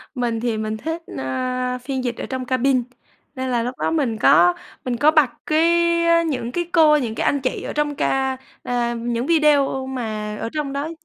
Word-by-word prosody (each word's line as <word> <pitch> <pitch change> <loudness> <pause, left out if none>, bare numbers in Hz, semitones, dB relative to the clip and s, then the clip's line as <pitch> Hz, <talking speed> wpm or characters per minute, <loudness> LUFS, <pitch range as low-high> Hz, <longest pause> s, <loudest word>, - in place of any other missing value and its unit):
Mình 240 -3 -1
thì 230 -1 -1
mình 215 0 -3
thích, 325 +8 -4 0.2
a, 250 - -2
phiên 260 +1 -4
dịch 240 -2 -3
ở - - -4
trong 260 -1 -4
cabin, 255 0 +1 0.5
nên 260 0 -3
là 240 -2 +1
lúc 250 +2 -4
đó - - 0
mình 275 -9 0
có 175 -3 +5 0.3
mình 245 -2 -1
có 295 +5 +5
bật 305 -5 +4 0.2
cái 315 +2 +3 0.4
á 335 0 +4
những 265 -7 -2
cái 345 +6 -2
cô, 315 -3 +6
những 235 -6 -3
cái - - -1
anh 285 - +2
chị 255 - -2
ở - - -5
trong 295 -1 -1
ca 265 -1 0 0.3
à, 240 -1 -1
những 235 +1 -2
video 290 -4 +3
mà 215 -5 -4
ở 225 - -3
trong 295 -3 -3
đó 285 +3 -3
255 Hz, 205 wpm, -21 LUFS, 235-290 Hz, 0.5 s, cô